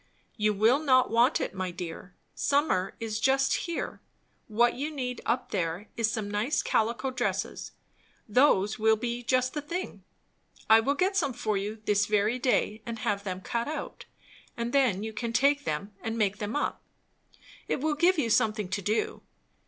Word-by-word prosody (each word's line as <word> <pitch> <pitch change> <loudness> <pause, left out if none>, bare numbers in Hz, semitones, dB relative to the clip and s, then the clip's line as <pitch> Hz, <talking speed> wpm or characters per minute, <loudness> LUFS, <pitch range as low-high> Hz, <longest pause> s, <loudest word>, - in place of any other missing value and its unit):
"You 210 -1 +2
will 225 +7 +4
not 255 -6 +3
want 235 +5 +4
it, - - -3
my 185 -1 -3
dear. 175 +1 -8 0.2
Summer 280 -11 +1
is 220 -2 -3
just 270 +3 +3
here; 340 -2 -3 0.5
what, 235 +2 +3
you 285 +4 -3
need 250 -5 -4
up 240 - -1
there 180 +1 -2
is 230 -2 +1
some 220 -2 -3
nice 210 +7 0
calico 235 +4 0
dresses; 250 -1 -3 0.5
those 215 -4 +3
will 220 0 +4
be 235 +2 -3
just 255 +1 +1
the 295 - -3
thing. 340 +6 -5 0.6
I 220 0 +8
will 275 +6 +1
get 380 +5 +1
some 285 -9 +1
for 215 -2 -1
you 210 +2 -4
this 210 0 +2
very 215 +4 +1
day, 230 -3 +1
and 230 0 -5
have 200 -2 -1
them 185 -2 -4
cut 235 +5 -2
out; 300 -1 -6 0.5
and 235 +1 -3
then 245 -8 +2
you 220 0 -5
can 230 +1 -3
take 285 +3 +3
them 200 +8 -3
and 225 0 -3
make 205 -2 +1
them 210 +4 -3
up. 295 - -1 0.9
It - - -1
will 305 +3 0
give 345 +5 +3
you 240 -7 0
something 215 -4 +1
to 195 +2 -2
do. 210 +4 -1
230 Hz, 175 wpm, -28 LUFS, 210-265 Hz, 0.9 s, I